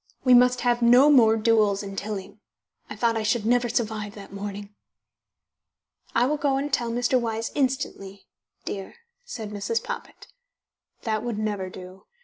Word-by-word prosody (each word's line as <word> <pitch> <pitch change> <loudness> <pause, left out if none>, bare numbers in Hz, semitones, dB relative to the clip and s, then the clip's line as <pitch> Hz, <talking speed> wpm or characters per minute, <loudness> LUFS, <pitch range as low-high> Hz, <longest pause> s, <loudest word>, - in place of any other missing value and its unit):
We 255 - +5
must 250 0 +5
have 240 -1 +1
no 250 +5 +6
more 225 -5 +5
duels 215 -3 +2
in 195 -1 -7
Tilling. 200 0 -6 0.5
I - - -6
thought 230 -1 +1
I 225 - -1
should 215 0 0
never 240 +1 +2
survive 215 -3 -2
that 200 -2 -11
morning." 200 0 -7 1.4
"I 235 - +4
will 300 +3 0
go 280 -2 +1
and 280 +1 -3
tell 240 -2 +1
Mr. 245 +2 +1
Wyse 225 -1 -3
instantly 255 -8 -3 0.4
dear," 195 -1 -6 0.3
said 220 - -7
Mrs. 210 +3 -2
Poppit. - - -7 0.8
That 215 -2 -1
would 235 -3 -4
never 205 -3 -2
do. 185 +1 -12
225 Hz, 155 wpm, -25 LUFS, 205-245 Hz, 1.4 s, no